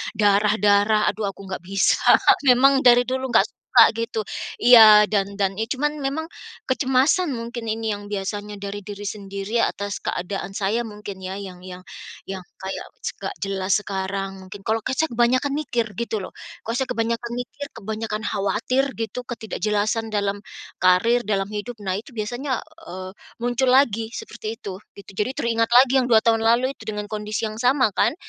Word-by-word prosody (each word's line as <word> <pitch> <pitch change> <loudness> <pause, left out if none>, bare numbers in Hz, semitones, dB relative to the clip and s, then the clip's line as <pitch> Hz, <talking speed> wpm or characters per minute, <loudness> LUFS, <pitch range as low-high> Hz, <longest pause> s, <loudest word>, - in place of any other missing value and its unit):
darah-darah, 210 0 +3
aduh 210 -2 -4
aku 195 - -15
nggak 185 - -5
bisa 195 0 +2 0.5
memang 270 +2 +6
dari 245 0 +7
dulu 260 +1 -2
nggak 225 -4 +5
suka - - +4
gitu. 230 0 -3 0.4
Iya 220 -3 +9
dan 200 -1 0
dan 195 -1 +1
ya - - +1
cuman 295 +3 0
memang 300 +4 -2 0.4
kecemasan 265 +6 +2
mungkin 235 0 -6
ini 220 -1 -2
yang 205 0 -10
biasanya 205 +1 -4
dari 200 +1 -5
diri 205 0 -8
sendiri 200 +2 -4
atas 205 0 -2
keadaan 195 +2 -3
saya 210 +4 0
mungkin 210 -2 -8
ya, 185 +1 -5
yang 185 -3 -9
yang 180 -1 -9 0.5
yang 190 -1 -6 0.2
kayak 190 0 -5 0.2
s - - +1
nggak 400 - -5
jelas 195 -1 -1
sekarang. 195 0 -3 0.2
Mungkin 195 +2 -9
kalau 220 +1 +1
ke - - -1
saya 320 - +2
kebanyakan 255 +4 +2
mikir 245 -6 -1
gitu 235 -2 -2
loh, - - -8 0.4
kalau 230 - -1
saya 265 0 -1
kebanyakan 235 0 -2
mikir, 280 +3 -6
kebanyakan 220 0 -4
khawatir 210 +6 0
gitu 225 +1 -3
ketidakjelasan 220 -1 -2
dalam 200 -1 0 0.4
karir, 185 +7 +4
dalam 195 -2 0
hidup 215 +3 -5
nah 190 -2 -2
itu 225 +6 -9
biasanya, 240 +4 -2 0.3
eee, 185 0 -7 0.3
muncul 245 +2 +1
lagi 230 -4 +3
seperti 220 -1 -6
itu 195 -5 -6 0.2
gitu 200 - -12
jadi 210 +5 0
teringat 230 -1 0
lagi 250 +1 +6
yang - - -1
2 220 - +7
tahun 225 -1 +3
lalu 235 +4 +3
itu - - -13
dengan 210 -1 -4
kondisi 215 +1 -3
yang 215 0 -7
sama 255 -1 +3
kan, - - +2
215 Hz, 170 wpm, -23 LUFS, 200-240 Hz, 0.5 s, Iya